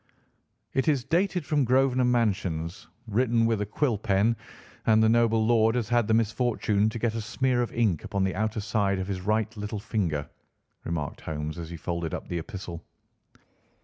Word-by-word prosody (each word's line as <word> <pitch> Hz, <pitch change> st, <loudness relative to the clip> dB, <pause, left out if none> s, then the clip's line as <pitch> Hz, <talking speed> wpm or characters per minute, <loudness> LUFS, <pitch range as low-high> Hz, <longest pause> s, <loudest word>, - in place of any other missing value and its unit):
"It 135 Hz, -, +1 dB
is 140 Hz, -5 st, +2 dB
dated 175 Hz, +3 st, 0 dB
from 145 Hz, -2 st, +2 dB
Grosvenor 130 Hz, 0 st, +3 dB
Mansions, 95 Hz, -8 st, 0 dB, 0.2 s
written 115 Hz, +1 st, +2 dB
with 115 Hz, -2 st, +1 dB
a 105 Hz, -, -2 dB
quill 115 Hz, 0 st, 0 dB
pen, 105 Hz, +2 st, +2 dB, 0.5 s
and 110 Hz, -1 st, +6 dB
the -, -, +5 dB
noble 115 Hz, -1 st, +3 dB
lord 115 Hz, 0 st, +4 dB
has 120 Hz, -4 st, 0 dB
had 120 Hz, -3 st, +2 dB
the 110 Hz, -, +2 dB
misfortune 110 Hz, -2 st, +1 dB
to 110 Hz, -, -5 dB
get 115 Hz, -1 st, 0 dB
a 115 Hz, -, -3 dB
smear 125 Hz, +3 st, 0 dB
of 120 Hz, -, -2 dB
ink 110 Hz, -9 st, +1 dB
upon 100 Hz, -2 st, -1 dB
the 95 Hz, -, 0 dB
outer 110 Hz, +1 st, -1 dB
side 100 Hz, -2 st, 0 dB
of 95 Hz, -, -2 dB
his 95 Hz, -2 st, -3 dB
right 110 Hz, +3 st, 0 dB
little 105 Hz, +1 st, -4 dB
finger," 85 Hz, -9 st, -2 dB, 0.6 s
remarked 75 Hz, -4 st, -3 dB
Holmes 75 Hz, +1 st, -4 dB
as 80 Hz, -1 st, -6 dB
he 85 Hz, -, -6 dB
folded 85 Hz, -1 st, -3 dB
up -, -, -7 dB
the 85 Hz, -, -2 dB
epistle. 85 Hz, 0 st, -7 dB
110 Hz, 180 wpm, -27 LUFS, 95-120 Hz, 0.6 s, and